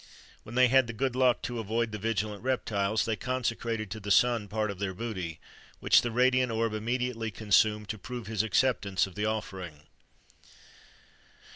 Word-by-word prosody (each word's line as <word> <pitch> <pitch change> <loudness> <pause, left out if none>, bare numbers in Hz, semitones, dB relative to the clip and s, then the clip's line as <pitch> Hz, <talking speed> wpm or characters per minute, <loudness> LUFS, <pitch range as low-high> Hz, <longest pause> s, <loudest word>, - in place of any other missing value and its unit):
When 115 - -10
they 130 0 +6
had 130 0 +4
the 115 - -5
good 130 +2 -1
luck 130 -1 +3
to 120 -1 -3
avoid 115 +1 -1
the 105 - -5
vigilant 105 -1 -2
reptiles, 110 -5 0
they 115 - 0
consecrated 115 -2 -2
to 110 - -5
the 100 -1 -7
sun 115 +1 +3
part 105 0 -1
of 95 - -9
their 95 -2 -3
booty, 95 -7 -5 0.4
which - - +5
the 120 - -2
radiant 125 +1 +2
orb 115 -1 0
immediately 115 +1 -2
consumed 105 0 +2
to 110 - -4
prove 120 +1 -7
his 105 -1 0
acceptance 110 -3 +1
of 95 - -11
the 105 +2 -2
offering. 95 -8 -5
110 Hz, 170 wpm, -29 LUFS, 105-120 Hz, 0.4 s, they